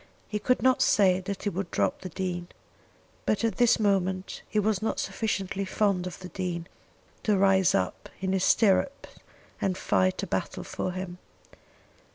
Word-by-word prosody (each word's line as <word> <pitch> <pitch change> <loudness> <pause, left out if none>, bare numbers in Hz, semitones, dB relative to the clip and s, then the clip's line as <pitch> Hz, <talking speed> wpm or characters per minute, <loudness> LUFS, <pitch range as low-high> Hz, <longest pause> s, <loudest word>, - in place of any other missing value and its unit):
He 210 - -2
could 250 +1 +1
not 260 -1 +4
say 185 -3 +4
that 195 +1 -5
he 205 - +1
would 190 -1 -4
drop 100 -2 0
the 185 - -6
Dean; 175 0 -3 0.8
but 215 - +1
at 225 - 0
this 240 -2 +4
moment 190 -3 0
he 215 - -2
was 210 -2 +2
not 220 - -1
sufficiently 195 -3 -2
fond 190 -1 0
of 180 - -7
the 180 - -7
Dean 175 -1 -3 0.6
to 210 -2 +2
rise 190 -2 +4
up 90 - -2
in 190 0 -1
his 190 -1 +1
stirrups 225 +6 +3 0.5
and 185 -2 0
fight 95 - +1
a - - 0
battle - - -3
for 185 - -3
him. 180 -1 -6
190 Hz, 170 wpm, -28 LUFS, 180-210 Hz, 0.8 s, not